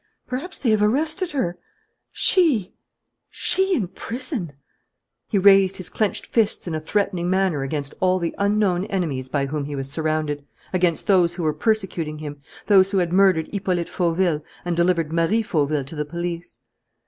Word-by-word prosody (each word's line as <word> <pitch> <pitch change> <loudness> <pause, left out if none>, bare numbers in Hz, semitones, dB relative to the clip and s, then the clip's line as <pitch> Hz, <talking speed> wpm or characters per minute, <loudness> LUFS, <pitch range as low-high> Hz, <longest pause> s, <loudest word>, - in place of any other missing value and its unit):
Perhaps 285 +9 -5
they 240 - +1
have 215 -1 +2
arrested 310 - +1
her? 175 -11 -2 0.5
She, 280 - +3 0.6
she 380 0 +2
in 205 - -1
prison!" 230 - -5 0.7
He 210 - 0
raised 195 -1 +5
his 185 - -3
clenched 215 -2 -1
fists 220 -5 0
in 170 - -3
a 155 - -1
threatening 180 +1 -1
manner 185 -6 +1
against 140 0 -3
all 185 0 +3
the 170 -2 -2
unknown 200 -3 +1
enemies 150 -11 -2
by 140 0 0
whom 145 +1 -3
he 145 0 -5
was 135 0 -3
surrounded, 155 -1 -1 0.3
against 175 -3 +1
those 175 -3 +3
who 175 - -4
were 155 -1 +1
persecuting 180 -9 -1
him, 145 -1 -8 0.2
those 195 -2 +5
who 195 - 0
had 175 -2 0
murdered 185 -4 +4
Hippolyte 185 -4 -1
Fauville 170 -3 0 0.2
and 175 -1 -1
delivered 170 -2 +1
Marie 170 +7 +2
Fauville 150 -7 0
to 145 - -9
the 150 - -1
police. 170 -3 -5
180 Hz, 165 wpm, -22 LUFS, 155-200 Hz, 0.7 s, raised